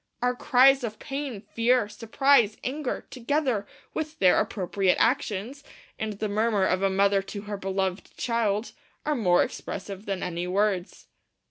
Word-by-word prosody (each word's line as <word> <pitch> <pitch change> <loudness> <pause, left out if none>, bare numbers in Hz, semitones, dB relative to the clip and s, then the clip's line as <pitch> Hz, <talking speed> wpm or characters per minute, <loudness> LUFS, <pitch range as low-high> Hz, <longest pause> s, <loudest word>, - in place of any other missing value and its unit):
'Our 250 0 +2
cries 265 +2 +5
of 220 -2 -4
pain, 275 -6 -5
fear, 230 +2 +1
surprise, 230 +1 +2
anger, 275 +1 -3
together 255 -4 -1 0.3
with 310 0 -4
their 185 -2 +5
appropriate 190 -1 0
actions, 235 +2 0 0.4
and 220 -1 -2
the 210 +2 -3
murmur 210 -1 +1
of 185 0 +1
a 195 - +3
mother 195 +1 +3
to 200 +1 -7
her 210 -1 -5
beloved 190 -1 -3
child, 225 -2 0 0.3
are 300 - +1
more 180 -8 +4
expressive 195 +1 -6
than 195 -2 -2
any 175 0 -3
words.' 190 -1 -1
215 Hz, 145 wpm, -26 LUFS, 195-250 Hz, 0.4 s, cries